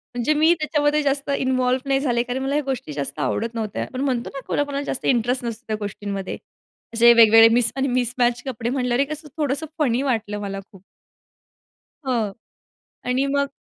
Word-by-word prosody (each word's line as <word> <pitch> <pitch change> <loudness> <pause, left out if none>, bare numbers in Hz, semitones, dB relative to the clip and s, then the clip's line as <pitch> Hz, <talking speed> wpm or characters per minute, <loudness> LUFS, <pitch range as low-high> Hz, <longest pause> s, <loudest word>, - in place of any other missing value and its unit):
म्हणजे 245 +6 +1
मी 315 +3 +4
त्याच्यामध्ये 300 0 +1
जास्त 280 0 -1
इन्व्हॉल्व 255 -1 +1
नाही 270 0 +3
झाले, 240 -4 +1
कारण 245 +2 -4
मला 275 +1 -1
ह्या 300 - +1
गोष्टी 260 - -4
जास्त 140 +1 -5
आवडत 225 - -2
नव्हत्या. 215 -3 -3
पण 255 - -3
म्हणतो 255 -4 -1
ना, 275 - -5
कोणाकोणाला 285 -1 -1
जास्त - - -4
इंटरेस्ट 245 0 +1
नसतो 230 +1 -5
त्या 215 - -1
गोष्टींमध्ये. 200 -1 -5 0.6
असे 235 +1 +7
वेगवेगळे 225 -1 +8
मिस 235 -1 +2
आणि 275 0 0
मिसमॅच 245 -1 +1
कपडे 235 -3 -3
म्हटल्यावरे, 250 +1 +1
कसं 305 +1 -7
थोडंसं 295 +1 -1
फनी 255 -3 +2
वाटलं 220 -6 -1
मला 195 -1 -4
खूप. 190 -2 -16 1.3
हो. 225 -6 0 0.7
आणि 255 +2 +1
मग. 280 0 +2
250 Hz, 170 wpm, -22 LUFS, 225-275 Hz, 1.3 s, वेगवेगळे